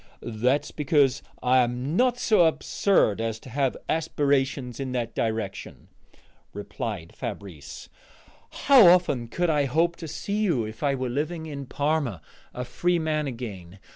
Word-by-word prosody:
"That's 125 +5 0
because 140 -3 +2 0.2
I 130 +1 +4
am 125 +5 -1
not 250 +3 +3
so 210 -8 +4
absurd 160 - +1
as 115 -1 -2
to 130 - -12
have 135 0 0
aspirations 140 -5 0
in 130 -2 -4
that 120 -2 -2
direction," 110 -3 -4 0.6
replied 105 - -6
Fabrice. 80 -9 -7 0.8
"How 265 -9 +8
often 170 -9 +4
could 175 +8 0
I 145 -2 +2
hope 165 +6 +1
to 165 - -7
see 180 +7 -4
you 160 - +1
if 110 +1 -9
I 140 -2 +1
were 130 -1 -3
living 155 +6 -3
in 140 -3 -7
Parma, 145 - -1 0.3
a 125 - -5
free 175 +7 0
man 155 -2 -1
again? 100 -8 -7
135 Hz, 145 wpm, -25 LUFS, 115-160 Hz, 0.8 s, How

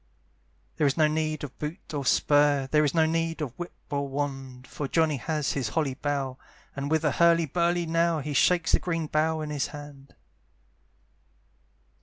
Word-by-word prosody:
There 150 - +3
is 140 - 0
no 155 -1 +5
need 155 -1 -1
of 140 -3 -8
boot 155 +3 -6
or 145 -2 -2
spur, 145 0 +3
There 150 0 +4
is 145 +2 0
no 160 -1 +4
need 165 0 -1
of 145 -6 -4
whip 175 - -6 0.2
or 140 -1 -1
wand, 135 -2 -4
For 145 - -5
Johnny 160 -1 +2
has 150 +2 -1
his 130 -6 -2
holly 145 0 0
bough, 135 -1 -3 0.4
And 140 0 -3
with 160 0 +1
a 150 - +3
hurly 170 +1 +4
burly 170 +3 0
now 165 0 +1
He 150 0 -4
shakes 170 +2 +3
the - - +4
green 165 -2 -2
bough 155 +1 0
in 150 -1 -4
his 145 -2 -1
hand. 145 -2 -11
150 Hz, 180 wpm, -27 LUFS, 140-165 Hz, 0.4 s, no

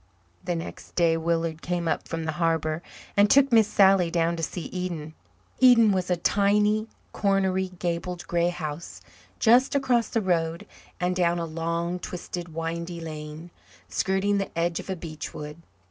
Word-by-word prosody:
The 180 -1 -1
next 165 - -8
day 170 -2 +3
Willard 165 -1 -1
came 175 -1 -2
up - - -1
from 165 0 -4
the 160 - -1
harbour 160 -1 0 0.3
and 205 +1 +5
took 275 +2 +5
Miss 225 -3 +6
Sally 195 -4 +4
down 170 0 +1
to 165 - -5
see 165 +2 -3
Eden. 170 -4 -4 0.5
Eden 240 -4 +7
was 185 -2 -1
a 180 - +2
tiny, 210 +4 +2 0.2
cornery, 190 -2 +1
gabled 175 0 -3
grey 170 0 +1
house 160 -2 -6 0.4
just 250 +4 +4
across 245 -4 +2
the 230 - 0
road 170 -4 0 0.3
and 180 0 0
down 175 -1 +2
a 170 - -2
long, 170 +2 -2
twisted 175 -1 -6
windy 170 +2 -4
lane, 155 +1 -8 0.4
skirting 195 +1 +1
the 195 - -2
edge 170 0 0
of - - -9
a 190 - -1
beech 160 -3 -7
wood. 150 +1 -8
175 Hz, 160 wpm, -26 LUFS, 165-195 Hz, 0.5 s, Eden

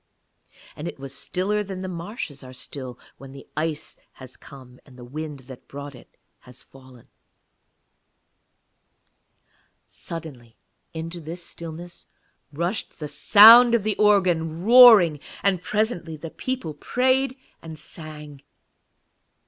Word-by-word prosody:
And 150 - -7
it - - -7
was 135 0 -9
stiller 205 +3 -2
than 190 -2 -7
the - - -4
marshes 170 - -7
are 130 0 -12
still 130 -1 -8 0.2
when 135 -1 -12
the 135 - -12
ice 155 -1 -4 0.2
has 130 -1 -13
come 125 -2 -15
and 130 -3 -19
the 120 - -11
wind 150 +1 -7
that 130 0 -14
brought 145 0 -9
it 125 - -18 0.2
has 125 0 -15
fallen. 130 -2 -18 2.8
Suddenly 135 -9 -10 0.3
into 165 +1 -7
this 170 +3 -8
stillness 170 +1 -10 0.4
rushed 170 +8 -4
the 150 - -6
sound 230 +8 +8
of 225 - 0
the 215 0 -1
organ, 175 -6 +1
roaring, 225 - +8 0.2
and 190 -3 +1
presently 180 -7 -2
the 160 +1 -9
people 255 -12 -5
prayed 260 - 0 0.2
and 160 -1 -10
sang. 150 -3 -9
160 Hz, 125 wpm, -23 LUFS, 140-195 Hz, 2.8 s, sound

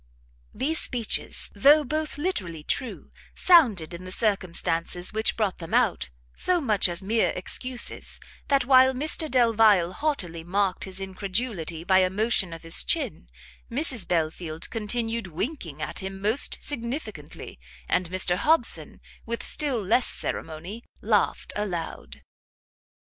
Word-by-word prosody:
These 300 +7 0
speeches, 235 -3 0
though 290 +9 +6
both 305 +2 -3
literally 185 - -3
true, 255 - -3 0.2
sounded, 220 - +4
in 170 +1 -8
the 185 - -8
circumstances 180 -4 -1
which 220 +1 0
brought 210 -4 -1
them 165 -2 -3
out, 60 - +2 0.3
so 365 -1 +2
much 215 - +3
as 175 +2 -4
mere 220 +3 +2
excuses, 250 +6 -2 0.3
that 275 -3 +2
while 260 0 +6
Mr 305 +4 -1
Delvile 220 -8 +4
haughtily 185 - -2
marked 190 +2 0
his 190 -1 -3
incredulity 190 -3 -3
by 190 +1 +4
a 185 -1 +3
motion 200 -2 +1
of 165 0 -9
his 165 0 +3
chin, 265 - -1 0.4
Mrs 260 -3 -1
Belfield 160 -1 -2
continued 225 0 -2
winking 170 - -5
at - - -3
him 190 0 -6
most 215 +7 +2
significantly, 230 - -5 0.3
and 180 -1 0
Mr 185 -1 +1
Hobson, 320 - +1 0.3
with 235 0 -3
still 270 -8 +1
less 225 +6 +3
ceremony, 175 +9 -5 0.2
laughed - - 0
aloud. 185 -6 -5
210 Hz, 130 wpm, -26 LUFS, 180-255 Hz, 0.4 s, though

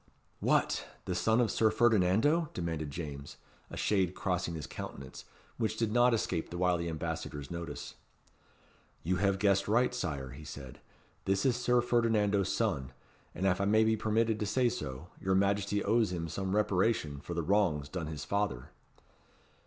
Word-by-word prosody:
"What! - - +1 0.2
the 90 - -2
son 110 +6 +2
of 120 -3 +2
Sir 110 - +3
Ferdinando?" 115 - +3
demanded 80 -4 -3
James, 70 -2 -7 0.3
a - - -8
shade 95 -3 +1
crossing 90 -3 -1
his 75 - -5
countenance, 65 -1 -8 0.3
which 110 -2 -1
did 115 -2 0
not 120 +2 +5
escape 95 -7 -1
the 85 - -6
wily 85 -2 +1
ambassador's 80 -3 -4
notice. 85 -1 -6 1.1
"You 90 +3 0
have 100 0 +2
guessed 100 -1 +2
right, 120 +4 +3
Sire," 70 - -3
he 70 +4 -10
said. 70 -4 -9 0.5
"This 95 +3 +1
is 130 -3 +3
Sir 125 0 +2
Ferdinando's 110 -5 +2
son; 65 0 -1 0.4
and, 95 - -2
if 95 0 +2
I - - +2
may 110 +2 +4
be 110 0 +3
permitted 110 0 +1
to 105 - -1
say 125 +2 +2
so, 70 - -6
your 95 0 +1
Majesty 100 +1 +1
owes 110 -1 +2
him 85 -2 -3
some 95 +4 -2
reparation 95 -7 +1
for 85 +3 -6
the 85 - -1
wrongs 85 -6 +2
done 80 0 -4
his 75 -2 -6
father." 100 -12 -2
95 Hz, 165 wpm, -31 LUFS, 80-110 Hz, 1.1 s, not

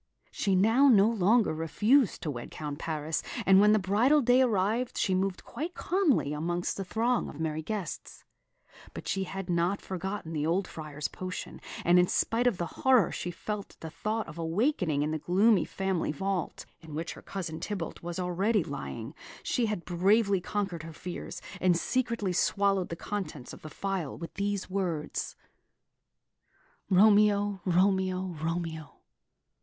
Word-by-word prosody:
She 195 -2 0
now 225 +9 +5
no 210 -6 +6
longer 220 -1 +3
refused 210 - +2
to 155 - -1
wed 120 -3 -7
Count 150 -1 -6
Paris; 155 -1 -2 0.2
and 190 0 +7
when 210 0 +6
the 215 - +5
bridal 215 +10 +3
day 245 +2 +5
arrived, 225 +1 +1
she 190 - +1
moved 190 0 -1
quite 340 +4 -5
calmly 330 - +1
amongst 175 +3 -2
the 195 - -3
throng 230 +6 0
of 150 - -10
merry 160 -1 -2
guests. 185 -3 -5 0.7
But - - -7
she 195 0 -1
had 195 -1 -6
not 175 +2 +1
forgotten 190 -2 -5
the 150 -2 -1
old 175 +4 +1
Friar's 150 -2 -5
potion; 185 0 -7 0.2
and 175 +1 +6
in 180 - +4
spite 235 +6 +1
of 230 -7 +2
the 175 - -2 0.2
horror 255 -9 +5
she 180 - -4
felt 205 +4 -5
at - - -44
the 160 - -7
thought 215 +4 -2
of 160 +1 -9
awakening 165 - +1
in 150 - -1
the 155 - -2
gloomy 195 +6 +3
family 190 -4 -1
vault, 190 +2 -3
in 160 -3 -10
which 165 +2 -3
her - - -12
cousin 170 -5 -5
Tybalt 195 -6 -5
was 170 0 -5
already 185 +5 +1
lying, - - -6 0.3
she 240 -3 0
had 210 -5 -3
bravely 195 +2 +3
conquered 195 -3 -3
her 165 +1 -9
fears, 175 +3 -7 0.2
and 180 -2 +3
secretly 230 -3 -1
swallowed 195 +1 +1
the 165 - -4
contents 165 -9 -5
of - - -11
the 155 - -8
phial 190 -2 -3
with 170 - -8
these 200 0 -2
words: 180 -6 -3 1.5
"Romeo, 205 0 +4
Romeo, 185 0 +1
Romeo! 165 -2 -3
190 Hz, 160 wpm, -29 LUFS, 165-210 Hz, 1.5 s, and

